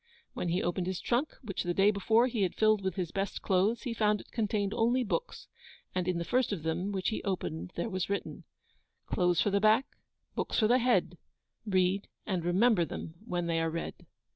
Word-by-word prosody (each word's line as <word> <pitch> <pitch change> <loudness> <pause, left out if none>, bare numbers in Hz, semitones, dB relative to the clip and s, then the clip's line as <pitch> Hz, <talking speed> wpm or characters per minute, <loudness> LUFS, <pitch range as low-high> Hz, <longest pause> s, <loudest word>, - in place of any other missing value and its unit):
When 175 - -2
he 180 +3 0
opened 175 +1 -1
his 185 -1 -2
trunk, 255 +5 0
which 200 -5 -3
the 175 0 -2
day 200 +2 +5
before 220 +4 +3
he 240 -4 -1
had 185 -3 0
filled 215 -1 +3
with 190 -2 -2
his 180 -3 -3
best 195 0 -3
clothes, 195 +5 +2
he 245 - -2
found 210 -2 +2
it - - -14
contained 210 -3 0
only 240 +3 +2
books. 485 - -3 0.5
And 185 -1 -1
in 180 -2 +1
the 170 - -2
first 250 +3 +1
of 185 -7 -3
them 170 +5 -1
which 190 -2 -1
he 215 - -3
opened 90 - -3
there - - -2
was 185 -4 -2
written 200 - -3 0.6
Clothes 175 -2 +2
for 205 - +1
the 200 0 +2
back, 215 +5 +5 0.5
books - - -2
for 215 - +4
the 245 +3 +4
head: 250 0 +1 0.5
Read 190 0 +2 0.2
and 185 -5 -1
remember 185 +3 +3
them 160 0 -6
when 175 -4 -1
they 165 -1 0
are 165 - +1
read. 165 +1 -4
195 Hz, 210 wpm, -31 LUFS, 175-220 Hz, 0.6 s, day